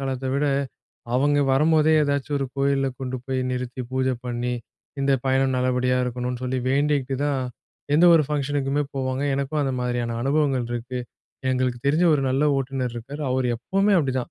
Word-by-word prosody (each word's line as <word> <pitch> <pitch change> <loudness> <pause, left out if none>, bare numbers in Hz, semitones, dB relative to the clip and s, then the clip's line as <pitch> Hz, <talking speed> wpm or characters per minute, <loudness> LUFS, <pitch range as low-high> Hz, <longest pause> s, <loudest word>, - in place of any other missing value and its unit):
காலத்த 135 -1 -3
விட, 145 +1 +1 0.7
அவங்க 145 +2 +3
வரும்போதே 155 +2 +4
எதாச்சும் 140 0 0
ஒரு 135 - -1
கோயில்ல 135 0 +1
கொண்டு 130 -1 -3
போய் 130 -1 -1
நிறுத்தி 125 0 -4
பூஜை 130 0 0
பண்ணி, 120 0 -2 0.5
இந்த 140 0 +2
பயணம் 130 0 +2
நல்லபடியா 125 0 +1
இருக்கணும்னு 125 0 -3
சொல்லி 130 +1 -1
வேண்டிக்கிட்டு, 140 -1 +1
தான் 140 -2 0 0.5
எந்த 165 +4 +5
ஒரு 160 - +5
ஃபங்ஷன்னுக்குமே 145 0 0
போவாங்க. 130 0 -2
எனக்கும் 140 +2 -1
அந்த 135 - -1
மாதிரியான 120 -1 -1
அனுபவங்கள் 135 -3 +1
இருக்கு. 125 +2 -4 0.5
எங்களுக்கு 125 -1 0
தெரிஞ்ச 155 +5 +3
ஒரு 140 - 0
நல்ல 135 +3 +2
ஓட்டுநர் 130 -2 -2
இருக்காரு. 135 +6 -7
அவரு 130 -1 +1
எப்பவுமே 195 - +1
அப்டிதான். 130 -4 -1
135 Hz, 155 wpm, -24 LUFS, 125-145 Hz, 0.7 s, எந்த